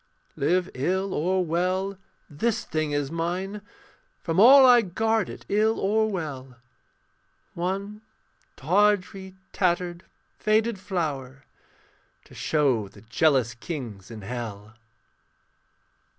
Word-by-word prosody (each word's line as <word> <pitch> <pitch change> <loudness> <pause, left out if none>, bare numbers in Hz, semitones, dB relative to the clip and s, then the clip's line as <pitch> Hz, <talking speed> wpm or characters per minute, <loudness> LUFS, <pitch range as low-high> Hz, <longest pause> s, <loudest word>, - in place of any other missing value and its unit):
Live 180 +6 +1
ill 185 +8 -1
or 185 +3 0
well, 185 +4 -1 0.3
this 205 +10 -1
thing 155 -1 -2
is 145 -1 -1
mine, 180 +5 -3 0.6
From 165 +1 0
all 265 +5 +9
I 245 -2 +7
guard 220 +2 0
it, - - -10
ill 215 +2 +1
or 220 +2 +1
well. 140 -9 -5 1.0
One 195 +4 -4 0.5
tawdry, 190 +2 +1 0.2
tattered, 175 -1 0 0.4
faded 215 0 +1
flower 140 -9 -4 0.8
To - - -18
show 135 -9 +1
the 95 - -16
jealous 125 0 +2
kings 115 - -7
in 110 -3 -9
hell. 110 -2 -7
175 Hz, 105 wpm, -25 LUFS, 135-200 Hz, 1.0 s, all